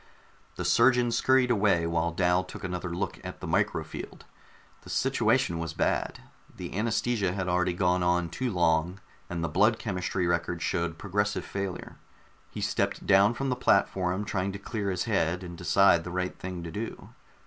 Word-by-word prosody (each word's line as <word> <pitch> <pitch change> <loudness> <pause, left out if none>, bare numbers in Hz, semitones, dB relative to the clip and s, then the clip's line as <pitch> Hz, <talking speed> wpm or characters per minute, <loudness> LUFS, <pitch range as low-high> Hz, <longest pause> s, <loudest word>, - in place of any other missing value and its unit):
The - - -4
surgeon 120 0 +4
scurried 130 +1 +3
away 100 -6 +3
while 85 0 0
Dal 90 +1 +2
took 90 - -10
another 90 -1 -3
look 85 - -4
at - - -7
the - - -7
micro - - 0
field. - - -9 0.6
The - - -14
situation 85 -1 +1
was 80 -1 -4
bad; - - -1 0.4
the - - -6
anaesthesia 110 -2 0
had 95 -1 -3
already 90 0 +1
gone 90 0 +2
on 90 -1 +1
too 130 +8 -2
long, 85 -1 +1 0.3
and 85 -1 -3
the - - 0
blood 105 +6 +3
chemistry 90 -3 -2
record 85 0 -1
showed 85 -1 -1
progressive 105 +2 -1
failure. 100 -2 -5 0.5
He - - -7
stepped - - -1
down 100 +4 +5
from 135 +3 -2
the 125 - +1
platform, 95 -4 +1
trying 95 -2 -1
to - - -5
clear 100 0 -3
his 90 -2 -1
head 90 -5 0
and 85 -1 -7
decide 85 0 +4
the 90 - -6
right 90 0 -2
thing 90 -2 -6
to 85 - -6
do. 110 +6 -6
90 Hz, 175 wpm, -28 LUFS, 85-105 Hz, 0.6 s, down